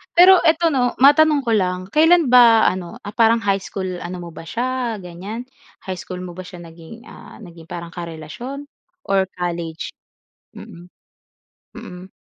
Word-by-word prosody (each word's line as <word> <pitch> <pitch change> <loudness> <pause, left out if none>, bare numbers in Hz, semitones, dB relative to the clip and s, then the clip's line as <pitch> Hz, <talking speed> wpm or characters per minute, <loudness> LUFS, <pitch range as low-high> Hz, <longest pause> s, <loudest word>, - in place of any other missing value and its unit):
Pero, 365 +1 +8
eto 325 0 +3
'no, 250 -3 +1
matanong 295 +1 +5
ko 230 - -2
lang. 185 -2 -1
Kailan 325 -2 +4
ba 235 -3 +6
ano, 180 -2 -6
ah, 205 - -7
parang 230 0 +3
high 195 -1 +1
school 190 0 -6
ano 175 +1 -7
mo 170 - -8
ba 165 - -11
siya, 245 0 -2
ganyan? 190 +7 -8 0.4
High 185 -2 -6
school 180 -1 -7
mo 180 - -7
ba 185 - -7
siya 180 -2 -11
naging, 165 +7 -13
ah, - - -13
naging 165 -2 -14
parang 170 -1 -8
karelasyon 175 - -8 0.4
or 195 -1 +2
college? 170 -2 -5 0.6
Mm. 175 +1 -13 0.9
Mm. 180 +1 -10
195 Hz, 155 wpm, -20 LUFS, 175-245 Hz, 0.9 s, Pero